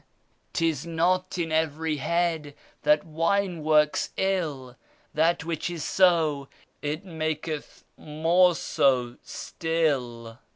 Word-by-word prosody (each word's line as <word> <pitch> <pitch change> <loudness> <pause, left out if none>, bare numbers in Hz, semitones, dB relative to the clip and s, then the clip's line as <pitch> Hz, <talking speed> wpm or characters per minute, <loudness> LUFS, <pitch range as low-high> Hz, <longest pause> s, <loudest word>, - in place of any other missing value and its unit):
" - - -43
'Tis 160 -5 0
not 180 +3 0
in 165 -2 -2
every 160 0 0
head 160 -1 -1 0.3
that 150 0 +3
wine 170 +2 0
works 150 -1 +3
ill; 155 -10 -1 0.4
That 165 +2 +2
which 170 0 -2
is 170 -4 -5
so, 160 -7 +2 0.3
it 155 +6 -3
maketh 155 -2 -4
more 165 +4 +3
so 125 -5 +1
still." 130 -8 -2
160 Hz, 110 wpm, -26 LUFS, 150-170 Hz, 0.4 s, that